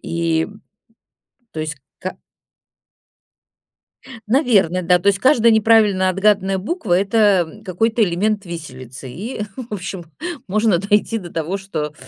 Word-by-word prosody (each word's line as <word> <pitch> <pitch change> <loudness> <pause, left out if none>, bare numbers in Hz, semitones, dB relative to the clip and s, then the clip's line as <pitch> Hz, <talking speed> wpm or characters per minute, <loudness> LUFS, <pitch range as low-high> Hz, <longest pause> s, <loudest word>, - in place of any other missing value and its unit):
и, 165 -1 -1 1.1
то 155 - -4
есть 155 -1 -4 0.2
ка 185 - -5 2.1
наверно, 210 - +3
да, 180 +1 +4
то 195 - -2
есть, 195 -1 +3
каждая 235 -3 +4
неправильно 215 -4 +4
отгаданная 195 0 +2
буква- 215 - -2
это, 200 -3 +3
м, - - -14
какой-то 220 +5 +1
элемент 200 +3 0
"виселицы" 130 -6 -8
и, 210 - -6
в 240 -4 -7
общем, 180 -2 -5 0.4
можно 215 -1 +2
дойти 205 +4 +1
до 175 -5 -8
того, 165 +4 -2
что 155 -6 -4
195 Hz, 125 wpm, -19 LUFS, 170-215 Hz, 2.1 s, да